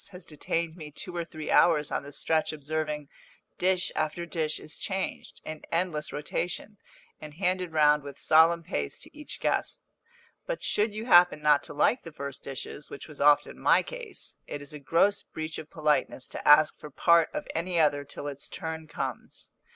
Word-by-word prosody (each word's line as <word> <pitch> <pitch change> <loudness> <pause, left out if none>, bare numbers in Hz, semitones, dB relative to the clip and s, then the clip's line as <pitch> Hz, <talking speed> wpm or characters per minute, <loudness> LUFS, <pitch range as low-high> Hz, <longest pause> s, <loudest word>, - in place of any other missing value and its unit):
has 180 -2 -11
detained 165 +2 -2
me 155 -4 -8
two 175 +4 -8
or 170 - -1
three 155 -2 -6
hours 150 -4 +4
on - - 0
the 140 - -10
stretch 160 +2 0
observing, 150 0 -3 0.5
dish 185 0 +2
after 155 +3 -1
dish 160 -3 -1
is 155 - -8
changed, 190 -1 -4
in 155 -1 -6
endless 165 -3 -1
rotation, 180 +7 -3 0.4
and 150 -1 -9
handed 180 0 0
round 150 -1 +4
with 140 -1 -9
solemn 165 +2 +5
pace 75 - -3
to - - -13
each 300 0 -7
guest; - - 0 0.6
but - - -3
should 210 +1 +1
you 215 +2 -5
happen 175 -8 +6
not 150 -1 +4
to - - -9
like 205 - +2
the 165 - -10
first 140 -2 -7
dishes, 135 +2 -6
which - - -9
was 150 -3 -9
often 145 0 +4
my - - +4
case, - - -7
it 145 - -5
is 145 +2 -9
a 150 - -7
gross 170 +8 +2
breach 160 0 -6
of 155 - -9
politeness 150 -4 0
to - - -7
ask 150 +1 +6
for 150 - -9
part 170 +3 +4
of 300 - -5
any 170 +1 -1
other 145 -2 +3
till 145 0 -8
its 140 -1 -4
turn 160 -1 -5
comes. 135 -4 -5
155 Hz, 185 wpm, -28 LUFS, 150-175 Hz, 0.6 s, happen